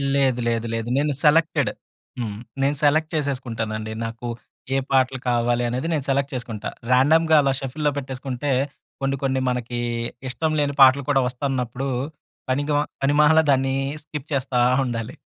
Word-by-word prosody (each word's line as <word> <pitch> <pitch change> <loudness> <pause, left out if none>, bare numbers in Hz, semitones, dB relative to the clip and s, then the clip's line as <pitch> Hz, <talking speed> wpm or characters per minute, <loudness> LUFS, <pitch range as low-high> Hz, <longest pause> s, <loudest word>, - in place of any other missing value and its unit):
లేదు 130 -3 +2
లేదు 115 0 0
లేదు. 115 0 -2
నేను 145 +1 +1
సెలెక్టెడ్. 150 -6 +3 0.5
హ్మ్. 105 -4 -3 0.2
నేను 140 +2 +2
సెలెక్ట్ 155 +2 +3
చేసేసుకుంటానండి. 115 -7 -2
నాకు 115 +1 -6 0.5
ఏ - - +3
పాటలు 130 0 +2
కావాలనేది 120 +3 0
నేను 145 -4 -1
సెలెక్ట్ 140 +1 +1
చేసుకుంటా. 115 -4 -5 0.2
రాండమ్‌గా 160 +5 +5
అలా 140 -1 +2
షఫుల్‌లో 145 +3 -1
పెట్టేసుకుంటే 135 0 -3 0.5
కొన్ని 135 0 0
కొన్ని 130 -1 +1
మనకి 120 -1 -3 0.5
ఇష్టం 155 +6 -1
లేని 145 -1 +1
పాటలు 135 +1 +7
కూడా 135 -2 +4
వస్తున్నప్పుడు 130 0 -2 0.6
పనికిమా 145 +2 +1 0.2
పనిమాలా 150 +3 +5
దాన్ని 135 0 +2 0.3
స్కిప్ 150 -1 -7
చేస్తా 130 -2 0 0.3
ఉండాలి. 120 0 -4
135 Hz, 135 wpm, -23 LUFS, 120-145 Hz, 0.6 s, పాటలు